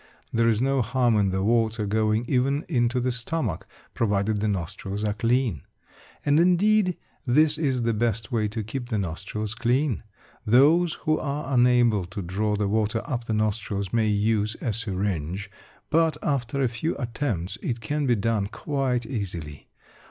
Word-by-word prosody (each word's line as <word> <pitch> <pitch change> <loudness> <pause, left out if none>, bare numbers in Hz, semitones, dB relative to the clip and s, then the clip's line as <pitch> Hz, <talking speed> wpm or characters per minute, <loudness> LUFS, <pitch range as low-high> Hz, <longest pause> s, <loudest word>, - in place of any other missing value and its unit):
There 115 0 +3
is 115 +1 +2
no 135 0 +2
harm 120 0 +2
in 100 -2 +2
the 95 0 -1
water 110 0 +1
going 110 +2 +1
even 135 +4 +1
into 120 -4 +1
the 125 +1 0
stomach 120 - -3 0.3
provided 105 -1 0
the 110 - +1
nostrils 100 +1 -3
are 105 -1 0
clean. 115 - 0 0.6
And 145 +1 +4
indeed, 185 +2 +3 0.3
this 150 +4 +3
is 130 -6 0
the 115 0 +1
best 115 +1 -1
way 110 -3 +1
to 110 +1 -4
keep 120 +3 -5
the 110 - 0
nostrils 100 +4 -3
clean. 125 +3 0 0.4
Those 150 +9 +4
who 155 0 +2
are 140 -1 -3
unable 120 -5 +4
to 95 +2 -6
draw 105 +4 -1
the 105 -1 0
water 110 +2 0
up 120 -2 -3
the 110 - -1
nostrils 105 -2 -1
may 115 -2 +2
use 105 0 +1
a 115 - -2
syringe, 100 -3 -3 0.4
but 160 0 +3
after 140 -1 0
a - - +3
few 120 +8 -3
attempts, 115 - -3
it 120 -2 -2
can 145 +5 -2
be 120 - +4
done 110 -1 0
quite 130 0 -1
easily. 90 - -5
115 Hz, 165 wpm, -25 LUFS, 105-130 Hz, 0.6 s, And